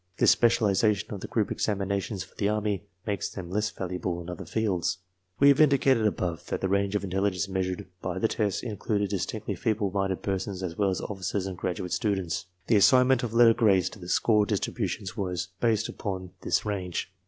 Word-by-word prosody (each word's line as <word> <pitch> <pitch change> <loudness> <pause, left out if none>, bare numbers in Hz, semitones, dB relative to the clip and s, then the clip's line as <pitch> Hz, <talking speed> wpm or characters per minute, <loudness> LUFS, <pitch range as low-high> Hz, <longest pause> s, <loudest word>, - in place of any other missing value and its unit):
This - - +6
specialization 105 -3 +2
of 100 - -6
the - - -5
group 110 -3 0
exam 105 -2 0
inations 100 -1 -2
for - - -18
the 100 - 0
Army 105 -2 -1 0.2
makes 105 -2 -2
them 90 -3 -8
less 105 +2 0
valuable 90 -1 -3
in 85 +1 -6
other 90 - -7
fields. 95 -6 0 0.4
We 140 - +7
have 140 +2 +5
indicated 135 -6 +4
above 90 -6 -3
that - - -3
the 95 - +1
range 100 +1 +1
of 105 - 0
intelligence 95 0 0
meas 95 -1 -1
ured 90 -1 -4 0.2
by 90 0 -3
the 105 - +2
tests 105 -3 -1
included 105 -2 -1
distinctly 105 +2 -2
feeble 110 -4 -1
minded 95 -1 -1
persons 95 -1 -2
as 85 -2 -4
well 100 +1 +2
as 95 - -2
officers 95 -1 -3
and 95 -1 -4
graduate 90 0 -3
students. 95 -5 -1 0.2
The 110 - +4
assignment 125 +4 +5
of 115 -2 -4
letter 115 -1 +7
grades 105 -6 +3
to 110 - -12
the 90 -1 -9
score 105 0 +3
distributions 105 +1 -2
was 90 -4 -3
based 110 -2 +2
upon 95 -3 -5
this - - 0
range. 95 -3 -3
100 Hz, 200 wpm, -27 LUFS, 95-110 Hz, 0.4 s, We